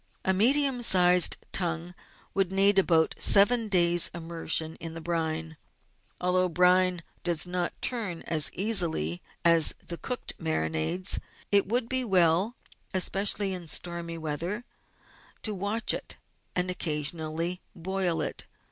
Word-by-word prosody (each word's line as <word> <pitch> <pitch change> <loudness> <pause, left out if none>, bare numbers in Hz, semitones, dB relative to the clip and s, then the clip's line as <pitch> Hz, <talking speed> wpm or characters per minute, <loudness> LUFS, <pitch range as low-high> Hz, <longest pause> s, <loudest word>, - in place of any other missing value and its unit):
A 190 - +2
medium 260 +5 +3
sized 180 -5 +5
tongue 170 -1 -2 0.4
would 195 -2 0
need 195 +1 +4
about 165 -4 +2
seven 225 +3 +4
days' 175 -3 +3
immersion 165 -1 -2
in 165 -1 -8
the - - -6
brine. 160 -1 -4 0.6
Though 180 0 +1
brine 180 0 +2 0.2
does 170 -2 +1
not 180 -1 -4
turn 210 -9 -2
as 155 -5 +3
easily 170 - +2 0.2
as 165 -2 +5
the 170 - -5
cooked 250 -1 -5
marinades, 160 +2 0 0.3
it 200 -1 +3
would 235 +2 -1
be 260 +1 0
well, 190 +1 +2 0.4
especially 195 +1 +2
in 180 -2 -7
stormy 170 +1 -4
weather, 165 +9 -4 0.8
to 215 - -2
watch 205 +4 -2
it - - -6 0.4
and 180 0 0
occasionally 160 +1 -1
to - - -36 0.2
boil 185 -1 -2
it. - - -6
180 Hz, 130 wpm, -27 LUFS, 165-195 Hz, 0.8 s, sized